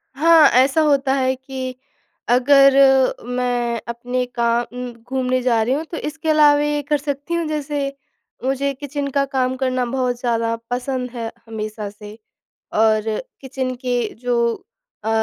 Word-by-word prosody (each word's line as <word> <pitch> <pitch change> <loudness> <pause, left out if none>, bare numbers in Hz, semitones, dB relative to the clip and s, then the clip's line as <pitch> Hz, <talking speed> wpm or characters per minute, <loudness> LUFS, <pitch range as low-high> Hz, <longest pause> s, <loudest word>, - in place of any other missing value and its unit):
हाँ, 320 +1 +6
ऐसा 265 +5 +4
होता 280 -3 +2
है 260 -1 +1
कि, 260 -1 -6 0.5
अगर 275 +2 +6 0.5
मैं 245 -2 -1
अपने 245 +2 -2
काम 235 0 +1
उम 250 0 -5 0.2
घूमने 255 -1 0
जा 235 -3 +2
रही 250 +4 0
हूँ, 305 +3 -1
तो 330 - -7
इसके 315 +1 -4
अलावे 295 -1 +5
ये 295 - 0
कर 295 - +3
सकती 285 +3 -4
हूँ। 335 -1 -1
जैसे, 290 -2 -3 0.5
मुझे 275 +1 0
किचन 285 +1 -4
का 275 0 +1
काम 260 -2 -1
करना 255 -1 -1
बहुत 250 -1 -1
ज़्यादा 230 -2 0 0.2
पसंद 250 0 -2
है 230 -2 -5 0.2
हमेशा 215 -1 -5
से, 210 +1 -12 0.6
और 215 0 +3 0.4
किचन 260 -1 -4
के 245 -1 +1 0.2
जो, 240 0 0 0.6
अ, - - -2
255 Hz, 150 wpm, -20 LUFS, 245-280 Hz, 0.6 s, हाँ